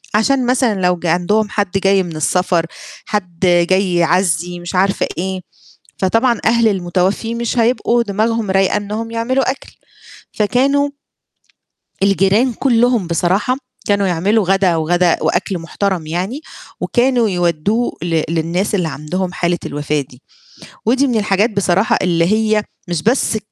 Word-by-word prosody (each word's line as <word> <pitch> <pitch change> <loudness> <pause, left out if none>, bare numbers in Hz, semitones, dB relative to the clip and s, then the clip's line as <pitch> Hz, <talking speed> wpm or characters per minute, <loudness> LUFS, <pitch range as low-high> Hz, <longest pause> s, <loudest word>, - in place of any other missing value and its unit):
عشان 255 +4 +2
مثلًا 240 -6 +1
لو 180 0 +2
ج - - -9
عندهم 205 +6 +1
حد 200 -4 -1
جاي 195 0 +2
من 170 -2 -7
السفر، 175 +2 +1 0.4
حد 180 -5 -4 0.3
جاي 185 -1 +2
يعزّي 175 0 +1
مش 175 +2 -6
عارفة 195 +2 +1
إيه، 185 +1 -3 0.6
فطبعًا 225 +4 +1
أهل 230 0 +3
المتوفي 190 +4 -1
مش 235 +1 -2
هيبقوا 235 0 +2
دماغهم 220 0 -1
رايقة 195 +1 +2
إنهم 215 +2 -4
يعملوا 255 +3 0
أكْل 270 - -11 0.6
فكانوا 275 +7 +1 1.2
الجيران 200 +5 +2
كُلّهم 240 -4 +2
بصراحة 180 +9 0 0.3
كانوا 200 -1 +2
يعملوا 190 +4 +1
غدا، 190 -2 +2
وغدا 175 +2 +2
وأكْل 185 -3 0
مُحترَم 175 0 -3
يعني، 185 - -3 0.4
وكانوا 245 -3 +2
يودّوه 175 +6 0
ل 165 -2 0
للناس 170 +5 -1
اللي 180 -5 0
عندهم 165 +6 -4
حالة 175 0 0
الوفاة 145 0 -2
دي، 125 -1 -14 0.6
ودي 260 +5 +2
من 240 -3 0
الحاجات 205 +1 +2
بصراحة 200 0 +1
اللي 170 -2 +2
هي 215 +2 +1 0.2
مش 170 -3 -3
بس 230 -1 +1
195 Hz, 135 wpm, -17 LUFS, 175-225 Hz, 1.2 s, أهل